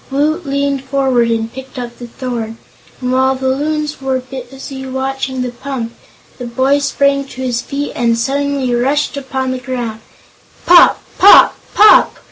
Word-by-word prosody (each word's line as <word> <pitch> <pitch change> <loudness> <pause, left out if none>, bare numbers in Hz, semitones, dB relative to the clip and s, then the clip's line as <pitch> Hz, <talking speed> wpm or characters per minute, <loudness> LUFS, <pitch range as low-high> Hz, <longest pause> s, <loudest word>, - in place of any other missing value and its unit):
Woot 300 +4 -1
leaned 280 -1 -1
forward 265 -3 +1
and 225 0 -2
picked 265 +1 -10
up 240 -1 -7
the 240 - -8
thorn, 235 -2 -5 0.4
and 250 -1 -2
while 260 +1 +2
the 260 0 -2
Loons 300 +2 -2
were 265 -1 -1
busy 265 +1 -9
watching 265 0 -3
the 250 - -4
pump, 245 -2 -6 0.5
the 245 - -5
boy 265 +4 +1
sprang 280 0 +1
to 260 -1 -8
his 245 -2 -1
feet 285 +3 -4
and 235 -1 +1
suddenly 275 +1 -1
rushed 275 +5 0
upon 265 -1 -3
the 255 - -3
group. 245 -3 -5 0.7
"Pop" 350 -1 +6 0.2
"pop" 400 - +7 0.2
"pop!" 425 - +6
265 Hz, 155 wpm, -15 LUFS, 245-280 Hz, 0.7 s, pop